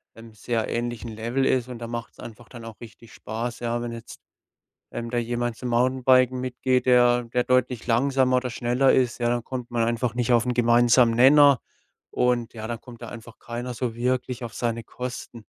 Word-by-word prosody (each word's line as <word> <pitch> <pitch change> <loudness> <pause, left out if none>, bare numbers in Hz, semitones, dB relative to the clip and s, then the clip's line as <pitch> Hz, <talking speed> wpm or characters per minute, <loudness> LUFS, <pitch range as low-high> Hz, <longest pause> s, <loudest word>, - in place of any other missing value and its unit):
ähm, 115 0 -13
sehr 110 +1 -2
ähnlichen 120 -1 -4
Level 115 +5 -2
ist 130 -2 +1
und 125 -2 -7
dann 115 0 -7
macht's 120 0 -7
einfach 115 0 -11
dann 120 -2 -10
auch 115 -1 -10
richtig 115 -2 -13
Spaß, 115 +4 -5
ja, 120 0 -2
wenn 120 - -4
jetzt, 115 -1 -10 0.7
ähm, 115 0 -5
da 120 - -1
jemand 120 0 -2
zum 125 - -5
Mountainbiken 130 +1 +3
mitgeht, 130 0 -1
der 120 -1 +4
der 120 +1 -1
deutlich 125 -2 0
langsamer 130 +1 +2
oder 125 0 -2
schneller 125 +3 +2
ist, 125 -3 +1
ja, 120 -1 +1
dann 120 -1 -1
kommt 125 -2 -6
man 120 -1 0
einfach 115 0 -1
nicht 120 0 +1
auf 120 0 +3
'n 125 - 0
gemeinsamen 120 0 +4
Nenner 140 +2 +6 0.5
und 125 -2 0
ja, 110 -1 -7
dann 120 -1 -5
kommt 120 -2 -13
da 120 - -7
einfach 115 -1 -11
keiner 120 +1 -6
so 120 -1 -3
wirklich 125 +1 -2
auf 115 - -6
seine 115 -1 -2
Kosten. 125 -2 -8
120 Hz, 195 wpm, -24 LUFS, 115-125 Hz, 0.7 s, Nenner